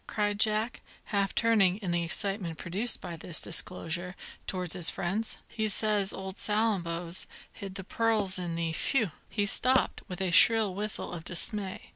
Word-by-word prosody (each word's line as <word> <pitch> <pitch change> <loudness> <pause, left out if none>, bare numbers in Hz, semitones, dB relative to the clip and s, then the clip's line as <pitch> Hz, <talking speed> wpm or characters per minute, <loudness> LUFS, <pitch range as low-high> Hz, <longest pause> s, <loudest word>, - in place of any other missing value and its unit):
cried 205 -1 -1
Jack, 215 +2 0 0.2
half 200 -2 -1
turning, 210 -5 +3
in 195 -5 -4
the 175 0 +1
excitement 185 -1 -2
produced 200 +8 +1
by 170 - -6
this 165 0 +4
disclosure, 175 +1 +3 0.3
towards 180 -3 -3
his 180 -3 +2
friends. 205 +6 -2
"He 220 -1 -2
says 210 -1 +1
old 190 0 -7
Salambo's 180 -6 -1 0.3
hid 195 -2 -8
the 195 - -5
pearls 210 -2 0
in 175 -2 -4
the 165 -1 -2
Phew!" 220 +2 0 0.2
He 205 -2 -1
stopped, 255 +6 +2
with 180 -1 -7
a 190 -2 -1
shrill 220 +2 +5
whistle 210 -1 -4
of 165 -2 -6
dismay. 190 +2 -2
195 Hz, 160 wpm, -29 LUFS, 175-215 Hz, 0.3 s, shrill